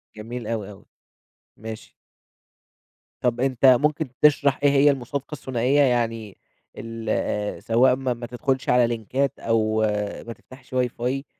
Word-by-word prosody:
جميل 115 Hz, +1 st, -7 dB
أوي، 110 Hz, -3 st, -3 dB
أوي. 100 Hz, -, -15 dB, 0.7 s
ماشي. 110 Hz, 0 st, -9 dB, 1.3 s
طب 120 Hz, -1 st, 0 dB
أنت 130 Hz, 0 st, +1 dB
ممكن 145 Hz, +3 st, +4 dB
تشرَح 145 Hz, -2 st, +4 dB
إيه 145 Hz, -, +6 dB
هي 140 Hz, +1 st, +5 dB
المُصادقة 140 Hz, +2 st, -5 dB
الثنائية 130 Hz, +1 st, +1 dB
يعني 115 Hz, -5 st, 0 dB, 0.4 s
ال 110 Hz, -2 st, -3 dB
سواء 125 Hz, +3 st, +4 dB
ما 130 Hz, -1 st, -2 dB
ما 120 Hz, 0 st, -8 dB
تدخُلش 130 Hz, +1 st, -2 dB
على 125 Hz, -1 st, +4 dB
لينكات 120 Hz, +4 st, -2 dB
أو 110 Hz, -1 st, +1 dB, 0.5 s
ما 115 Hz, -, -5 dB
تفتَحش 130 Hz, +1 st, -17 dB
واي 125 Hz, -1 st, +1 dB
فاي، 130 Hz, +4 st, -3 dB
125 Hz, 130 wpm, -23 LUFS, 115-135 Hz, 1.3 s, إيه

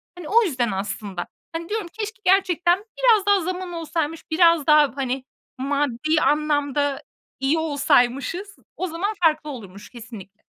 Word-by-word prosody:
Hani, 355 Hz, -3 st, -9 dB
o 465 Hz, +2 st, +5 dB
yüzden 255 Hz, -, -1 dB
aslında. 195 Hz, -1 st, -4 dB, 0.3 s
Hani, 330 Hz, +1 st, -5 dB
diyorum 425 Hz, -3 st, -2 dB
keşke 425 Hz, -1 st, -6 dB
gerçekten 365 Hz, 0 st, +3 dB
biraz 465 Hz, -5 st, +4 dB
daha 405 Hz, -1 st, +4 dB
zaman 365 Hz, +1 st, -4 dB
olsaymış, 325 Hz, -1 st, -3 dB
biraz 335 Hz, -2 st, +4 dB
daha, 300 Hz, -2 st, +6 dB
hani, 260 Hz, -1 st, -2 dB, 0.3 s
maddi 285 Hz, +2 st, 0 dB
anlamda 290 Hz, -2 st, +1 dB, 0.4 s
iyi 270 Hz, +4 st, +1 dB
olsaymışız. 290 Hz, +5 st, +1 dB, 0.2 s
O 370 Hz, -, -2 dB
zaman 360 Hz, +6 st, -2 dB
farklı 310 Hz, -2 st, +2 dB
olurmuş 205 Hz, -6 st, -9 dB
kesinlikle. 220 Hz, -4 st, -12 dB
310 Hz, 135 wpm, -23 LUFS, 270-360 Hz, 0.4 s, daha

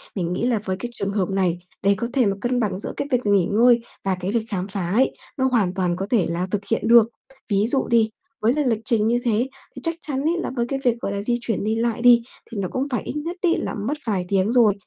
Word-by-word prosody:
mình 175 Hz, -3 st, -1 dB
nghĩ 205 Hz, -, -2 dB
là 235 Hz, -3 st, +1 dB
với 190 Hz, -, -1 dB
cái 240 Hz, -, -4 dB
trường 200 Hz, -3 st, -3 dB
hợp 200 Hz, -3 st, 0 dB
này, 185 Hz, -3 st, 0 dB, 0.2 s
để 200 Hz, +1 st, +5 dB
có 235 Hz, -, -2 dB
thể 260 Hz, -3 st, +3 dB
mà 200 Hz, -1 st, +1 dB
cân 245 Hz, +1 st, 0 dB
bằng 200 Hz, -5 st, -1 dB
giữa -, -, -4 dB
cái -, -, -2 dB
việc 250 Hz, -2 st, +1 dB
nghỉ 200 Hz, -3 st, +4 dB
ngơi 235 Hz, +3 st, +4 dB, 0.2 s
và 195 Hz, -1 st, +1 dB
cái 185 Hz, +2 st, -2 dB
lịch 230 Hz, -2 st, 0 dB
khám 190 Hz, -3 st, -2 dB
phá 190 Hz, -4 st, -3 dB
ấy, 250 Hz, +7 st, +3 dB, 0.3 s
nó 260 Hz, -, +1 dB
hoàn 205 Hz, -7 st, +2 dB
toàn 180 Hz, -2 st, 0 dB
có 190 Hz, -, -3 dB
thể 225 Hz, -8 st, +3 dB
là 175 Hz, +2 st, -2 dB
thực 210 Hz, -, 0 dB
hiện 225 Hz, -, +1 dB
được. 235 Hz, -1 st, +7 dB, 0.4 s
Ví 205 Hz, +1 st, +2 dB
dụ 265 Hz, +2 st, +1 dB
đi, 230 Hz, -2 st, +3 dB, 0.3 s
với 225 Hz, +3 st, +3 dB
là 300 Hz, 0 st, 0 dB
lịch 230 Hz, -4 st, +1 dB
trình 220 Hz, -2 st, +2 dB
như 240 Hz, +1 st, +2 dB
thế 235 Hz, +1 st, +1 dB, 0.3 s
thì -, -, -8 dB
chắc 330 Hz, 0 st, -1 dB
chắn 270 Hz, -2 st, -1 dB
ấy, 330 Hz, +4 st, +1 dB
là -, -, -2 dB
mấy 240 Hz, -2 st, -1 dB
cái 270 Hz, +1 st, -2 dB
việc, 240 Hz, -2 st, +2 dB
gọi -, -, -2 dB
là, 200 Hz, 0 st, -2 dB
di 240 Hz, +3 st, 0 dB
chuyển 225 Hz, -4 st, -2 dB
đi 215 Hz, +2 st, 0 dB
lại 230 Hz, 0 st, -1 dB
đi, 240 Hz, -1 st, +7 dB, 0.3 s
thì 230 Hz, -, -6 dB
nó 185 Hz, -, -1 dB
cũng 265 Hz, +2 st, -1 dB
phải 245 Hz, -, -1 dB
ít -, -, -5 dB
nhất 325 Hz, +4 st, -3 dB
ấy 350 Hz, -4 st, +3 dB
là -, -, -3 dB
mất 225 Hz, +9 st, -2 dB
vài 190 Hz, -4 st, 0 dB
tiếng 195 Hz, +2 st, +1 dB
rồi. 235 Hz, -4 st, +5 dB
225 Hz, 285 wpm, -23 LUFS, 195-245 Hz, 0.4 s, được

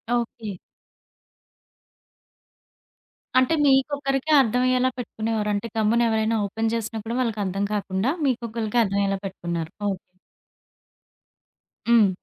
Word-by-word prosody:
Okay. 225 Hz, -4 st, -3 dB, 2.8 s
అంటే, 260 Hz, +5 st, +2 dB
మీకొక్కరికే 275 Hz, +1 st, +2 dB
అర్థవయ్యేలా 255 Hz, +1 st, +2 dB
పెట్టుకునేవారు. 220 Hz, -3 st, -2 dB
అంటే, 205 Hz, +3 st, -2 dB
గమ్మునెవరైనా 225 Hz, 0 st, +2 dB
open 225 Hz, +3 st, -1 dB
చేసినప్పుడు 225 Hz, 0 st, -4 dB
వాళ్ళకర్థం 205 Hz, -5 st, -1 dB
కాకుండా 200 Hz, +4 st, 0 dB
మీకొక్కళ్ళకే 235 Hz, -3 st, -1 dB
అర్థవయ్యేలా 195 Hz, -1 st, 0 dB
పెట్టుకున్నారు. 170 Hz, -4 st, -4 dB, 0.2 s
ఓకే. 190 Hz, -2 st, -4 dB, 1.9 s
హ్మ్. 225 Hz, -4 st, +6 dB
225 Hz, 80 wpm, -24 LUFS, 205-245 Hz, 2.8 s, హ్మ్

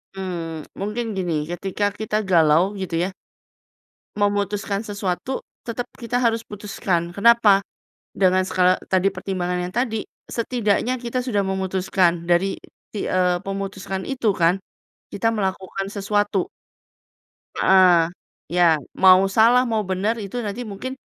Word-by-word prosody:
Mmm, 170 Hz, -4 st, -5 dB, 0.2 s
mungkin 210 Hz, +4 st, -2 dB
gini, 180 Hz, -3 st, -1 dB, 0.2 s
ketika 195 Hz, +3 st, -1 dB
kita 215 Hz, +1 st, -3 dB
galau 160 Hz, -2 st, +5 dB, 0.2 s
gitu 185 Hz, -3 st, -3 dB
ya 185 Hz, -, -1 dB, 1.1 s
memutuskan 205 Hz, 0 st, -1 dB
sesuatu 200 Hz, +4 st, -3 dB, 0.2 s
tetap 235 Hz, +1 st, -4 dB
kita 245 Hz, +1 st, -1 dB
harus 230 Hz, -1 st, +1 dB
putuskan. 195 Hz, -4 st, -2 dB
Kenapa? 210 Hz, 0 st, +5 dB, 0.5 s
Dengan 185 Hz, -1 st, +2 dB
skala 185 Hz, 0 st, +3 dB, 0.2 s
tadi 190 Hz, +1 st, +2 dB
pertimbangan 180 Hz, -1 st, -2 dB
yang 180 Hz, -, -4 dB
tadi, 230 Hz, -3 st, 0 dB, 0.2 s
setidaknya 235 Hz, +1 st, 0 dB
kita 245 Hz, +1 st, -3 dB
sudah 205 Hz, -6 st, 0 dB
memutuskan. 185 Hz, -2 st, 0 dB
Dari, 175 Hz, +3 st, +1 dB, 0.3 s
ti 205 Hz, -, -4 dB
eee, 180 Hz, -1 st, +2 dB
memutuskan 195 Hz, -1 st, -4 dB
itu 245 Hz, -7 st, 0 dB
kan, 175 Hz, +2 st, +2 dB, 0.5 s
kita 225 Hz, +3 st, 0 dB
melakukan 195 Hz, -1 st, -3 dB
sesuatu. 205 Hz, -1 st, 0 dB, 1.1 s
Heeh. 180 Hz, -3 st, +5 dB, 0.4 s
Ya, 170 Hz, -3 st, +3 dB, 0.2 s
mau 185 Hz, 0 st, +6 dB
salah, 230 Hz, +5 st, +5 dB
mau 220 Hz, -2 st, 0 dB
benar, 190 Hz, +4 st, -1 dB
itu 200 Hz, +5 st, -5 dB
nanti 220 Hz, +1 st, -4 dB
mungkin 230 Hz, +4 st, -6 dB
195 Hz, 120 wpm, -22 LUFS, 185-215 Hz, 1.1 s, mau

